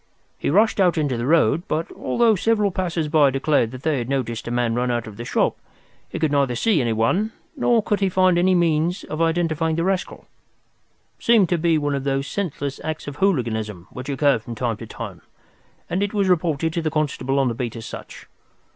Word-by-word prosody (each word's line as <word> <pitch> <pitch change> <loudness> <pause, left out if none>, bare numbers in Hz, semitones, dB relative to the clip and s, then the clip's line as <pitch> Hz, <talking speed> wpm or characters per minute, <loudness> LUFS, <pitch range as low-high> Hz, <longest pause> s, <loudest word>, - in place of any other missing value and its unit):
He - - -1
rushed 210 +7 +3
out 180 -3 +3
into 145 -5 0
the 120 +1 -2
road, 160 -1 +3
but, 160 +2 -2
although 235 -2 +2
several 210 +1 +1
passers 175 -4 -2
by 150 -2 +4
declared 135 -3 +1
that 130 +2 -10
they 155 -4 +1
had 120 +1 -4
noticed 120 -5 -2
a - - -2
man 120 -1 0
run 125 +1 0
out 120 -1 -1
of 110 - -10
the 120 - -7
shop, - - +1 0.5
he - - -5
could 155 -2 0
neither 140 -4 +1
see 190 - +2
anyone 120 - +1 0.2
nor 240 -5 +2
could 210 - 0
he 195 -1 +2
find 185 -1 +3
any 185 +1 +3
means 170 +1 +1
of 155 +2 -5
identifying 165 -1 +1
the 165 - 0
rascal. 190 0 -2 0.9
It - - -15
seemed 225 -6 +5
to 175 - +2
be 165 -1 +2
one 145 -1 -1
of 140 -1 -2
those 135 0 -1
senseless 145 -7 -4
acts 155 -1 -4
of 145 0 -6
hooliganism 110 - -1
which 125 +2 -7
occur 140 -2 +2
from 115 +1 -8
time 115 -2 -2
to - - -9
time, - - -8 0.7
and 180 +3 -1
it 205 +1 -1
was 200 -2 +2
reported 160 -3 +1
to 170 - -1
the 160 - -1
constable 140 -3 -1
on 135 -1 +3
the 120 - 0
beat 120 0 -4
as 115 - -7
such. - - -9
155 Hz, 215 wpm, -22 LUFS, 125-180 Hz, 0.9 s, seemed